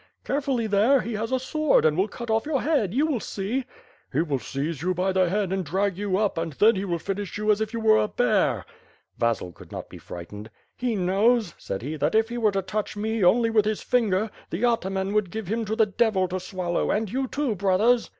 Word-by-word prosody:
"Carefully 270 Hz, -4 st, -1 dB
there; 220 Hz, +6 st, +4 dB
he 235 Hz, -, -4 dB
has 220 Hz, +3 st, -3 dB
a 260 Hz, -, +3 dB
sword 305 Hz, -, +2 dB
and 155 Hz, -1 st, +4 dB
will 190 Hz, +4 st, +2 dB
cut 235 Hz, +2 st, -8 dB
oflE 220 Hz, +5 st, +1 dB
your 285 Hz, -4 st, 0 dB
head. 285 Hz, -, +1 dB
You 275 Hz, +8 st, +2 dB
will 295 Hz, -7 st, 0 dB
see." 215 Hz, +7 st, -3 dB, 0.5 s
"He 150 Hz, +5 st, +1 dB
will 145 Hz, -5 st, -1 dB
seize 140 Hz, +4 st, -4 dB
you 180 Hz, +2 st, 0 dB
by 185 Hz, +2 st, +1 dB
the 185 Hz, -2 st, +2 dB
head 195 Hz, 0 st, 0 dB
and 190 Hz, -1 st, -1 dB
drag 190 Hz, +4 st, 0 dB
you 195 Hz, -1 st, -1 dB
up 205 Hz, -5 st, 0 dB
and 165 Hz, -2 st, -3 dB
then 215 Hz, +9 st, +4 dB
he 195 Hz, +1 st, -2 dB
will 175 Hz, -3 st, -1 dB
finish 195 Hz, +3 st, -4 dB
you 210 Hz, 0 st, +2 dB
as 210 Hz, +1 st, +1 dB
if 220 Hz, 0 st, -1 dB
you 230 Hz, -, -3 dB
were 220 Hz, -1 st, +5 dB
a -, -, +1 dB
bear." 215 Hz, -4 st, +1 dB, 0.5 s
Vasil 115 Hz, -6 st, 0 dB
could -, -, -15 dB
not -, -, -7 dB
be -, -, -11 dB
frightened. 105 Hz, +5 st, -9 dB, 0.3 s
"He 245 Hz, -2 st, -1 dB
knows," 200 Hz, +2 st, +2 dB
said 95 Hz, -, -5 dB
he, 155 Hz, +4 st, -4 dB
"that 150 Hz, +6 st, 0 dB
if 220 Hz, +1 st, +3 dB
he 240 Hz, 0 st, -3 dB
were 215 Hz, -2 st, +3 dB
to 195 Hz, -1 st, -1 dB
touch 210 Hz, +2 st, -3 dB
me 220 Hz, 0 st, -1 dB
only 230 Hz, +5 st, +4 dB
with 215 Hz, -2 st, +3 dB
his 215 Hz, -1 st, -1 dB
finger, 215 Hz, -4 st, +1 dB, 0.2 s
the 200 Hz, +9 st, -1 dB
ataman 195 Hz, -4 st, 0 dB
would 210 Hz, -3 st, +1 dB
give 220 Hz, +3 st, -5 dB
him 225 Hz, +5 st, -2 dB
to 215 Hz, +1 st, -2 dB
the 220 Hz, -1 st, +4 dB
devil 205 Hz, -2 st, +1 dB
to 185 Hz, +1 st, -2 dB
swallow, 180 Hz, -1 st, -2 dB
and 210 Hz, -2 st, 0 dB
you, 265 Hz, +1 st, -1 dB
too, 280 Hz, -3 st, -1 dB
brothers." 205 Hz, +5 st, +2 dB
210 Hz, 235 wpm, -25 LUFS, 185-230 Hz, 0.5 s, were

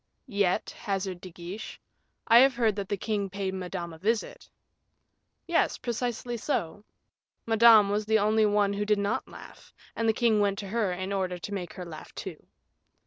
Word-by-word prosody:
"Yet," 200 Hz, -4 st, 0 dB
hazarded 195 Hz, -3 st, -4 dB
De 185 Hz, -, -8 dB
Guiche, 180 Hz, +5 st, -8 dB, 0.5 s
"I 230 Hz, 0 st, +8 dB
have 265 Hz, 0 st, +5 dB
heard 225 Hz, -4 st, +2 dB
that 195 Hz, -2 st, -4 dB
the 205 Hz, -, -1 dB
king 205 Hz, -1 st, -2 dB
paid 195 Hz, 0 st, -3 dB
Madame 180 Hz, -2 st, -5 dB
a 160 Hz, -, -12 dB
visit." 220 Hz, +5 st, -2 dB, 1.0 s
"Yes, 340 Hz, -, +1 dB
precisely 240 Hz, 0 st, -3 dB
so. 205 Hz, -, -2 dB, 0.6 s
Madame 225 Hz, -2 st, +7 dB
was 210 Hz, +1 st, -1 dB
the 220 Hz, 0 st, +4 dB
only 215 Hz, +1 st, +3 dB
one 205 Hz, -1 st, +2 dB
who 205 Hz, +1 st, -1 dB
did 210 Hz, 0 st, +2 dB
not 200 Hz, 0 st, -1 dB
laugh, -, -, -13 dB, 0.2 s
and 230 Hz, 0 st, +1 dB
the -, -, +4 dB
king 225 Hz, -2 st, +2 dB
went 200 Hz, -1 st, +1 dB
to 200 Hz, -, -5 dB
her 215 Hz, -3 st, 0 dB
in 185 Hz, +2 st, -3 dB
order 185 Hz, -2 st, -1 dB
to 200 Hz, +4 st, -7 dB
make 180 Hz, -4 st, -5 dB
her 180 Hz, -, -7 dB
laugh, 160 Hz, -2 st, -10 dB
too." -, -, -7 dB
205 Hz, 180 wpm, -28 LUFS, 190-220 Hz, 1.0 s, I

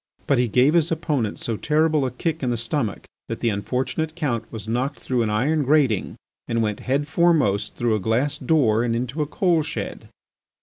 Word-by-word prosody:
But 140 Hz, -, +2 dB
he 125 Hz, -, +2 dB
gave 125 Hz, +7 st, +3 dB
his 170 Hz, -1 st, +2 dB
opponent 150 Hz, -9 st, -1 dB
so 115 Hz, -2 st, -3 dB
terrible 155 Hz, -1 st, +2 dB
a -, -, -1 dB
kick 160 Hz, +6 st, -3 dB
in 130 Hz, -, 0 dB
the 120 Hz, -, 0 dB
stomach 115 Hz, -1 st, -2 dB, 0.2 s
that -, -, -4 dB
the 115 Hz, -, +1 dB
unfortunate 130 Hz, +9 st, -2 dB
Count 120 Hz, -9 st, -2 dB
was 110 Hz, -1 st, -7 dB
knocked 125 Hz, +5 st, -1 dB
through 125 Hz, -2 st, -1 dB
an 110 Hz, -, 0 dB
iron 140 Hz, +9 st, +1 dB
grating 135 Hz, -7 st, +2 dB, 0.3 s
and 115 Hz, 0 st, 0 dB
went, 105 Hz, -2 st, -2 dB
head 140 Hz, +3 st, -1 dB
foremost, 155 Hz, -, +2 dB
through 120 Hz, -2 st, +1 dB
a 110 Hz, -, +1 dB
glass 115 Hz, +8 st, 0 dB
door 120 Hz, -9 st, +2 dB
and 115 Hz, -1 st, 0 dB
into 125 Hz, +5 st, -2 dB
a 150 Hz, -, 0 dB
coal 170 Hz, 0 st, +2 dB
shed. -, -, -5 dB
130 Hz, 200 wpm, -23 LUFS, 115-155 Hz, 0.3 s, gave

